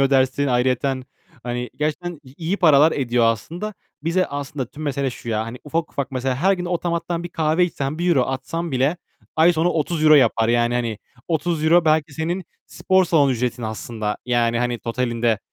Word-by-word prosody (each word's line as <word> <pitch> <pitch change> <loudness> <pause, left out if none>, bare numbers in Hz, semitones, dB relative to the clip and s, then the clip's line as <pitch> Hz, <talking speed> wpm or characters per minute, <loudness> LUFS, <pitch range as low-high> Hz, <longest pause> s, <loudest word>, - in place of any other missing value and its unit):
ödersin 135 +1 +2
ayrıyeten. 130 +1 +1 0.4
Hani, 125 0 -4
gerçekten 155 +2 -3
i 130 0 -15
iyi 170 +4 -2
paralar 155 -4 +5
ediyor 120 -3 +1
aslında. 170 - -2 0.3
Bize 170 +3 +1
aslında 145 -1 -4
tüm 145 +6 -10
mesele 140 -2 -1
şu 120 - -10
ya, 110 -1 0
hani 115 +2 -7
ufak 160 +2 -2
ufak 140 0 -3
mesela 130 0 -1
her 185 +8 +3
gün 180 -2 -2
otomattan 170 -1 -2
1 175 - -5
kahve 160 +1 +1
içsen, 150 -3 -3
€1 170 -6 +3
atsan 145 +5 -4
bile 135 +6 +1 0.4
ay 165 +2 +6
sonu 165 +1 +1
€30 155 -1 +3
yapar. 115 -5 +4
Yani, 120 0 +2
hani, 115 -3 -1 0.3
€30 165 +1 +2
belki 155 -1 +2
senin 170 +4 -2 0.2
spor 190 0 +2
salonu 155 -5 +3
ücretin 125 0 -2
aslında. 110 -1 -4
Yani, 120 -1 +1
hani, 120 0 -1
totalinde. 115 -2 -1
140 Hz, 170 wpm, -22 LUFS, 125-165 Hz, 0.4 s, ay